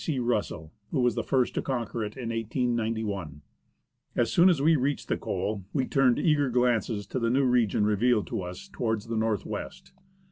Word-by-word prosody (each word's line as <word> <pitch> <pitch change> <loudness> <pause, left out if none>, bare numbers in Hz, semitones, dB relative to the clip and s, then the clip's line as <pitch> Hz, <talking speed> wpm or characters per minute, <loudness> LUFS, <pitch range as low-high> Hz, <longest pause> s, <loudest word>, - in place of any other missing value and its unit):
C. 155 -5 -1
Russell, 105 -10 -2 0.2
who 135 - 0
was 125 -1 +3
the 115 - -1
first 130 -2 +1
to - - -1
conquer 120 -3 -3
it, 105 +3 -6
in 120 -3 -4
1891. 110 - -2 0.7
As 120 - +1
soon 175 +2 +6
as 170 -6 +2
we 160 +4 +4
reached 140 +1 -1
the - - +2
col, 105 -2 -3
we 135 -3 +1
turned 130 -3 +3
eager 150 -5 +2
glances 120 -4 +1
to 130 - -3
the 115 -1 +1
new 135 +3 +3
region 120 -5 +2
revealed 105 +1 +2
to 115 -5 -2
us 90 - -7
towards 110 - -2
the 115 - -2
north 110 -3 0
west. - - -7
120 Hz, 190 wpm, -27 LUFS, 105-130 Hz, 0.7 s, soon